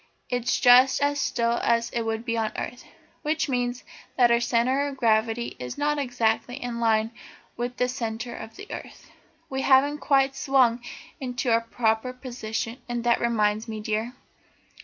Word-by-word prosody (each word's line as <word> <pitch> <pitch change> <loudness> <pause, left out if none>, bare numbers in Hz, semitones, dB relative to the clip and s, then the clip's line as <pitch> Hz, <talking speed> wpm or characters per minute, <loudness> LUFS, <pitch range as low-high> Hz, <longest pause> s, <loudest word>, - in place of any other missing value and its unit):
It's 245 -1 0
just 255 +1 +6
as 285 0 +1
still 235 -1 0
as 235 0 +1
it 235 - -1
would 225 0 -3
be 230 -1 -1
on 220 -1 -1
earth. 245 - -5 0.4
That 310 +1 0
means 245 -1 -1 0.3
that 240 -2 +5
our 235 - +4
centre 250 +4 +1
of 275 -1 -6
gravity 225 0 +1
is 125 0 -6
not 295 0 0
exactly 245 -2 0
in 245 -3 -5
line 225 -1 +2 0.4
with 245 +1 -4
the 250 - +2
centre 235 -1 -4
of 220 - -9
the 410 - -9
earth. - - -9 0.4
We 265 0 -3
haven't 280 +2 +4
quite 270 -2 +2
swung 260 -4 +3 0.4
into 250 -1 -2
our 230 0 +4
proper 230 +1 0
position, 240 -2 -5
and 240 -1 -2
that 240 0 +2
reminds 215 -2 +1
me, 220 -1 -5
dear. 220 +3 -2
240 Hz, 165 wpm, -26 LUFS, 225-260 Hz, 0.4 s, just